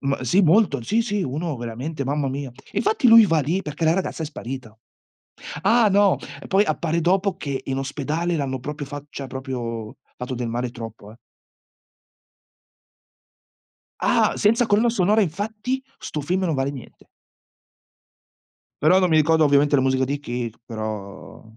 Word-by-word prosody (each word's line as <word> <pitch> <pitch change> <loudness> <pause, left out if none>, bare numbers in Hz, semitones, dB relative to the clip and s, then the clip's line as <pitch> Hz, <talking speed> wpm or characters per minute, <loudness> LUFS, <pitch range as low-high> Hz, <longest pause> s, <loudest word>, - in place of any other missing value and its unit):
M 140 0 -1
sì, 130 +10 +3
molto, 165 - +3
sì, 220 - +1
sì, 205 -4 -1
uno 155 +1 -3
veramente, 125 +6 -5
mamma 140 0 -1
mia. 135 0 -4
E 125 +3 -18
infatti 415 - +2
lui 225 -1 +9
va 165 -3 +2
lì 170 +8 -1
perché 150 +1 -4
la 160 +1 +4
ragazza 185 -3 -2
è - - -2
sparito. 120 -6 -8 0.8
Ah, 225 +1 +4
no! 200 0 +4 0.3
Poi, 195 +1 +4
appare 170 -4 -1
dopo 190 +2 +1
che 140 -7 -4
in 135 -1 -2
ospedale 150 +5 -2
l'hanno 135 -3 -2
proprio 145 +2 -6
fa 145 0 -7
cioè 135 -1 -7
proprio, 120 -5 -5 0.2
fatto 125 +1 -5
del 120 -1 -3
male 120 +1 -2
troppo, 115 -3 -9
eh. 110 - -14 2.9
Ah! - - +3
Senza 230 +4 +3
colonna 220 +3 +3
sonora, 210 0 +2
infatti, 215 - -3 0.2
'sto 150 - -5
film 180 +6 -1
non 165 -4 0
vale 135 +1 0
niente. 135 -4 -12 1.8
Però, 185 +5 +5
non 185 - +3
mi 160 - +3
ricordo 160 +1 +4
ovviamente 145 0 +3
la 130 - +4
musica 130 0 +2
di 140 +2 -3
chi 120 -3 -4
c - - -25
però 110 -4 -7
145 Hz, 160 wpm, -23 LUFS, 130-185 Hz, 2.9 s, lui